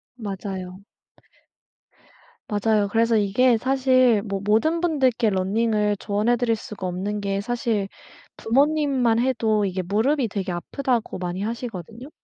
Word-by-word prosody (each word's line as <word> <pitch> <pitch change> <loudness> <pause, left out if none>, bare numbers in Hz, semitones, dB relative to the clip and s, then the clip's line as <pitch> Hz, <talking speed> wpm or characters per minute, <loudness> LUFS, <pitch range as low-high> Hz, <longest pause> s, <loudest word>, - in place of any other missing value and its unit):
맞아요. 195 -4 -6 1.7
맞아요. 210 0 +1
그래서 230 +2 +2
이게 225 +4 +3
사실 255 -3 +3
뭐 195 -2 -4
모든 310 - +2
분들께 260 -8 +1
running을 210 +2 +1
조언해 210 +4 +1
드릴 235 -2 +1
수가 200 -3 -8
없는 200 +4 -3
게 195 0 -1
사실 220 -2 -1 0.5
부모님만 270 -2 +2
해도 225 -4 +1
이게 185 -1 -2
무릎이 230 - +1
되게 195 -3 -4
아프다고 235 +7 -2
많이 180 +1 -4
하시거든요. 230 - -6
220 Hz, 310 characters per minute, -23 LUFS, 200-245 Hz, 1.7 s, 이게